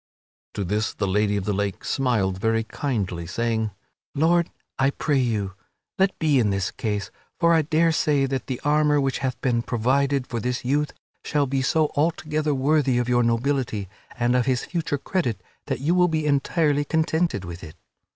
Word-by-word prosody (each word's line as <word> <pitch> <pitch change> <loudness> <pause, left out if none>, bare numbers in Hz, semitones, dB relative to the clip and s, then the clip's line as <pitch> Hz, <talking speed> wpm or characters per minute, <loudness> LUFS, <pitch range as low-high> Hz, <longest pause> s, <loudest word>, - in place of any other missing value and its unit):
To 100 - -1
this 105 +4 -1
the 100 - -1
Lady 105 +1 +1
of 95 - -3
the 105 - 0
Lake 100 0 -2
smiled 105 -9 0
very 115 0 +2
kindly, 100 - -3
saying, 110 +3 -1 0.5
"Lord, 170 +3 +3 0.3
I 135 +1 +4
pray 140 0 0
you, 105 -6 -1 0.5
let 190 0 +2
be 150 -5 +3
in 110 -4 +2
this 100 -2 -1
case, 105 -3 -3 0.3
for 170 -1 +4
I 165 - +5
daresay 155 -2 +2
that 135 -1 -3
the 130 -2 -3
armor 150 0 +3
which 135 -1 0
hath 130 -2 -2
been 120 -3 +1
provided 135 +4 +1
for 120 - -4
this 125 +2 -3
youth 145 +3 +1 0.3
shall 145 -1 +1
be 135 0 -1
so 155 +3 +2
altogether 155 -1 0
worthy 135 -1 +2
of 120 -1 0
your 120 0 +3
nobility 120 -3 0 0.3
and 120 +1 +2
of 125 0 +2
his 130 -2 +1
future 165 -4 -2
credit 140 - -1 0.3
that - - -2
you 155 +5 +2
will 180 0 +4
be 160 -2 -1
entirely 145 +1 +2
contented 160 - 0
with 85 0 -8
it." 80 -2 -10
130 Hz, 180 wpm, -24 LUFS, 110-150 Hz, 0.5 s, I